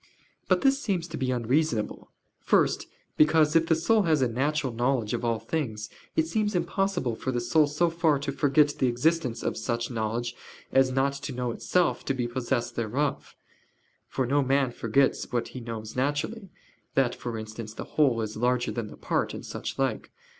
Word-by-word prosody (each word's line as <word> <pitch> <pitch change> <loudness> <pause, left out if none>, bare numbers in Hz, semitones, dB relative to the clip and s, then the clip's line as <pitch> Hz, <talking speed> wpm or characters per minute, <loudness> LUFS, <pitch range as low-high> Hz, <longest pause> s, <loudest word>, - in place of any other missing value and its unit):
But - - +3
this 275 0 +3
seems 185 - -1
to 155 - -6
be 130 -2 -1
unreasonable. 125 -1 0 0.3
First, - - +2 0.3
because, 155 0 +4
if 165 0 +4
the 160 - +4
soul 215 +7 +3
has 160 -7 +2
a - - +3
natural 135 +2 -1
knowledge 120 -2 0
of - - -2
all 115 -1 +1
things, 110 -3 -3 0.2
it 160 - +3
seems 210 +4 -1
impossible 175 - 0
for 130 - -3
the 120 - 0
soul 150 +5 +3
so 150 +4 +1
far 165 -3 +2
to 140 0 -3
forget 145 +1 +3
the 130 - +3
existence 125 -1 0
of - - -1
such 115 +2 -2
knowledge 120 +1 -2 0.4
as 135 -1 +4
not 135 +1 +1
to 145 0 -5
know 125 -1 -2
itself 180 +9 +1
to 135 - 0
be 120 -2 -1
possessed 120 -1 -2
thereof: 135 +5 -2 0.7
for 130 - -1
no 140 +4 +2
man 135 -1 +2
forgets 125 +4 +1
what 120 -1 -1
he 130 - -7
knows 115 -2 -6
naturally; 145 - -1 0.5
that, 135 -3 +3
for 120 -2 -5
instance, 110 0 -7
the - - -5
whole 130 -7 +2
is 110 -1 -4
larger 125 +2 +1
than 115 -3 -3
the - - -11
part, - - -1
and - - -8
such - - -5
like. - - -1
130 Hz, 185 wpm, -27 LUFS, 120-155 Hz, 0.7 s, because